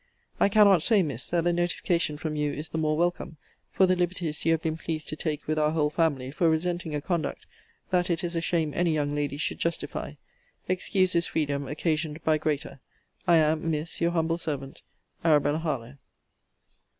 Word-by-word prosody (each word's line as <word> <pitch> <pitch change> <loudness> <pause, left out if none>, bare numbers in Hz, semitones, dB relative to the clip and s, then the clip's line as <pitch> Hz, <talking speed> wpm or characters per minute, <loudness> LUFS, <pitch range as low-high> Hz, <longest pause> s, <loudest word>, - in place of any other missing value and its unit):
I - - +4
cannot 200 -4 +6
say, 210 +1 +3
Miss, 130 -6 -4
that 170 -1 +1
the 175 0 +2
notification 170 -2 0
from 155 0 -4
you 150 -1 0
is 150 +1 -4
the 160 - -3
more 155 -1 +1
welcome, 175 -1 -1 0.3
for 190 - +4
the 185 0 +3
liberties 175 -3 -1
you 165 - +3
have 160 -1 +1
been 160 -1 -1
pleased 160 -2 -4
to 155 - -3
take 155 -1 -3
with 155 0 0
our 150 0 +3
whole 150 -2 +1
family 145 -5 0
for 165 +3 +2
resenting 165 0 -1
a 145 - -2
conduct, 170 -2 -2 0.5
that 180 -1 +2
it 170 -1 0
is 175 0 -2
a 165 - 0
shame 165 -3 0
any 170 -2 +2
young 145 -1 0
lady 145 -1 -2
should 150 - -2
justify. 170 0 -2 0.5
Excuse 185 0 +1
this 170 -1 +2
freedom, 140 -3 -1
occasioned 155 0 -2
by 155 -1 +2
greater. 150 -2 -2 0.5
I 170 - +6
am, 155 0 +2
Miss, 155 +2 -3
Your 170 - +3
humble 165 0 0
servant, 140 -4 -5 0.4
ARABELLA 150 -1 +3
HARLOWE. 140 -5 -4
160 Hz, 190 wpm, -27 LUFS, 150-170 Hz, 0.5 s, cannot